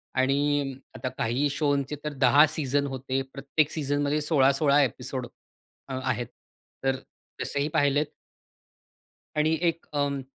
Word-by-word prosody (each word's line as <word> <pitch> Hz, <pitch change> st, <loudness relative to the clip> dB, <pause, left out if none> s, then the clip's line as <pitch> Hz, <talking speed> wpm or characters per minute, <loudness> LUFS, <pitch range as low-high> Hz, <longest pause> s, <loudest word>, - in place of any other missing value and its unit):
आणि 140 Hz, +1 st, +1 dB, 0.2 s
आता 130 Hz, -, -3 dB
काही 125 Hz, +6 st, +1 dB
शोंचे 140 Hz, 0 st, 0 dB
तर 150 Hz, -1 st, -3 dB
10 140 Hz, +4 st, +7 dB
सीझन 140 Hz, -1 st, 0 dB
होते. 135 Hz, 0 st, -2 dB
प्रत्येक 145 Hz, +2 st, 0 dB
सीझनमध्ये 145 Hz, 0 st, 0 dB
16-16 140 Hz, -1 st, +4 dB
एपिसोड 125 Hz, 0 st, -3 dB, 0.6 s
आहेत. 130 Hz, -3 st, -2 dB, 0.6 s
तर 135 Hz, 0 st, +2 dB, 0.5 s
तसेही 140 Hz, +1 st, -1 dB
पाहिलेत. 145 Hz, +1 st, +3 dB, 1.3 s
आणि 155 Hz, +1 st, +2 dB
एक 170 Hz, -1 st, 0 dB
अं 140 Hz, -1 st, 0 dB
140 Hz, 110 wpm, -27 LUFS, 135-145 Hz, 1.3 s, 10